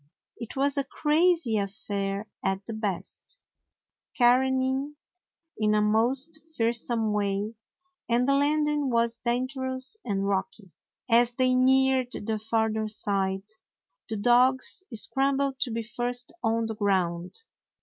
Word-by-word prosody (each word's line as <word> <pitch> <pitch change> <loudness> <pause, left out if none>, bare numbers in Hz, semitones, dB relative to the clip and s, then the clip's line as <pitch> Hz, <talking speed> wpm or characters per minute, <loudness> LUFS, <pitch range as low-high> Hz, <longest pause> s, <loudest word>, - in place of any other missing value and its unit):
It 230 - -7
was 280 +1 +1
a - - +1
crazy 305 -3 +2
affair 200 0 -3 0.2
at 195 +1 -1
the 225 - -5
best, 215 - -5 0.8
careening' 265 +3 +2 0.6
in 215 -1 +2
a 210 - +3
most 255 +9 +1 0.2
fearsome 230 -1 0
way, 205 +1 -1 0.6
and 240 +2 +2
the 275 - +4
landing 295 0 +2
was 235 -1 +1
dangerous 260 - -2
and 195 -3 -1
rocky. 195 0 -3 0.4
As 240 +1 +4
they 255 0 +2
neared 260 0 +3
the 220 0 -3
farther 220 0 0
side 195 -2 -2 0.7
the 220 - -2
dogs 250 - +3
scrambled 270 +3 0
to 255 - 0
be 230 +1 -3
first 245 +2 -4
on 225 0 +1
the 225 - -3
ground. 185 -4 -1
235 Hz, 120 wpm, -27 LUFS, 210-265 Hz, 0.8 s, the